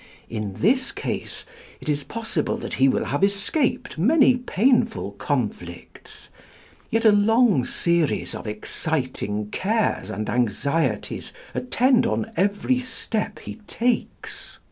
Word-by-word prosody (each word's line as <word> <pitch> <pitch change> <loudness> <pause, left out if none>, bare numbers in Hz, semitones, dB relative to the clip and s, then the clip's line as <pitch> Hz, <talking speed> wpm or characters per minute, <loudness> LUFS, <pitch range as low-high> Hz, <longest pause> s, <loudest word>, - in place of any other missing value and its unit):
In 105 -3 -3
this 255 - +2
case, - - -5 0.3
it - - -12
is 145 -1 0
possible 225 -8 -2
that - - -6
he 135 - +7
will - - +1
have 145 +6 -1
escaped 200 - 0
many 255 - +5
painful 235 - +1
conflicts; 100 -7 -5 0.6
yet 225 +1 +1
a 220 - +8
long 210 - +4
series 170 -3 0
of - - -7
exciting 105 -2 -2
cares 220 +3 0
and 105 +2 -4
anxieties 125 +7 -1 0.2
attend 255 0 +2
on 110 +1 -2
every 205 +7 +1
step 245 -3 -3
he - - -7
takes. 240 0 -2
185 Hz, 120 wpm, -24 LUFS, -, 0.6 s, a